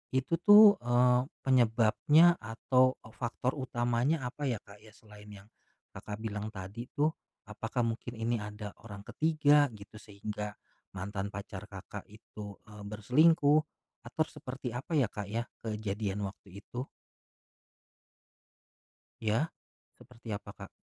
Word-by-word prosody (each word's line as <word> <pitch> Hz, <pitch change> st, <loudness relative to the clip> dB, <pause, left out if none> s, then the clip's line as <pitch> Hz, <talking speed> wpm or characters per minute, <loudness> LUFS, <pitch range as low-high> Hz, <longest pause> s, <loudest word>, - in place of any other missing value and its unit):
itu 130 Hz, +4 st, 0 dB
tuh, 205 Hz, +2 st, +9 dB
eee, 125 Hz, +1 st, +3 dB, 0.2 s
penyebabnya 130 Hz, +7 st, +4 dB
atau 130 Hz, +3 st, +2 dB
e 110 Hz, -, -13 dB
faktor 125 Hz, +2 st, -2 dB
utamanya 130 Hz, +3 st, 0 dB
apa 140 Hz, +4 st, -3 dB
ya, 120 Hz, -5 st, -2 dB
Kak, 100 Hz, 0 st, -15 dB
ya, 110 Hz, 0 st, -17 dB
selain 105 Hz, -1 st, -15 dB, 0.2 s
yang -, -, -23 dB, 0.4 s
Kakak 105 Hz, +1 st, -8 dB
bilang 105 Hz, -1 st, -3 dB
tadi 100 Hz, +6 st, -7 dB
tuh 150 Hz, +1 st, +2 dB, 0.4 s
apakah 115 Hz, +3 st, -2 dB
mungkin 115 Hz, +1 st, -3 dB
ini 115 Hz, +1 st, -1 dB
ada 105 Hz, 0 st, -7 dB
orang 100 Hz, -2 st, -9 dB
ke-3 150 Hz, +1 st, +3 dB
gitu 100 Hz, +1 st, -12 dB
sehingga, 105 Hz, 0 st, -6 dB, 0.4 s
mantan 95 Hz, +1 st, -4 dB
pacar 100 Hz, 0 st, -7 dB
Kakak, 100 Hz, 0 st, -9 dB
itu, 105 Hz, -1 st, -10 dB
eee, 105 Hz, -1 st, -12 dB
berselingkuh, 145 Hz, +8 st, +4 dB, 0.5 s
atau 155 Hz, +6 st, 0 dB
seperti 130 Hz, -4 st, -6 dB
apa 130 Hz, +8 st, -4 dB
ya, 135 Hz, -8 st, +3 dB
Kak, 105 Hz, -2 st, -5 dB
ya, 115 Hz, +3 st, -2 dB, 0.2 s
kejadian 105 Hz, -2 st, -3 dB
waktu 100 Hz, 0 st, -12 dB
itu? 125 Hz, +3 st, -6 dB, 2.3 s
Ya, 115 Hz, +9 st, 0 dB, 0.5 s
seperti 120 Hz, -1 st, -15 dB
apa, -, -, -10 dB
Kak? -, -, -12 dB
115 Hz, 130 wpm, -31 LUFS, 105-130 Hz, 2.3 s, tuh